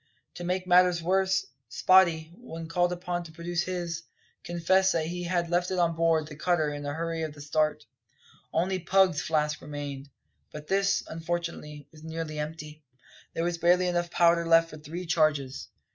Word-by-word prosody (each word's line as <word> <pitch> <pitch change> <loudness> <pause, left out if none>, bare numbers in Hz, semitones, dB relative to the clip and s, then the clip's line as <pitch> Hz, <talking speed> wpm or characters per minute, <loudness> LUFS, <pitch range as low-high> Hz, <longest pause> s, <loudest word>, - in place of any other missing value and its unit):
To 175 - -8
make 180 +1 -1
matters 180 -1 +4
worse, 190 +2 +2 0.2
Spottie, 170 -4 +4
when 165 -8 -8
called 175 +1 +1
upon 180 0 -3
to 170 -2 -11
produce 170 +2 -2
his, 175 -2 -3 0.4
confessed 190 +3 +2
that 160 -2 0
he 175 +2 -4
had 175 -1 -1
left 175 +1 +1
it 185 - -2
on 170 -2 +2
board 165 -1 +2
the 150 0 -10
cutter 155 -2 0
in 145 - -6
the 145 0 -4
hurry 165 0 -3
of 155 -2 -4
the - - -13
start. 155 +1 0 0.7
Only 185 +3 0
Pug's 185 -2 +3
flask 150 -1 0
remained; 145 -1 -6 0.4
but 150 0 -8
this, 195 +3 +1
unfortunately, 165 -3 -5
was 155 -1 -16
nearly 160 -1 -5
empty. 150 0 -6 0.5
There 165 - -1
was 170 0 -1
barely 175 +2 +4
enough 175 -1 0
powder 170 0 +3
left 165 0 +5
for 155 - -9
three 165 +4 -7
charges. 150 -5 0
170 Hz, 175 wpm, -28 LUFS, 155-175 Hz, 0.7 s, left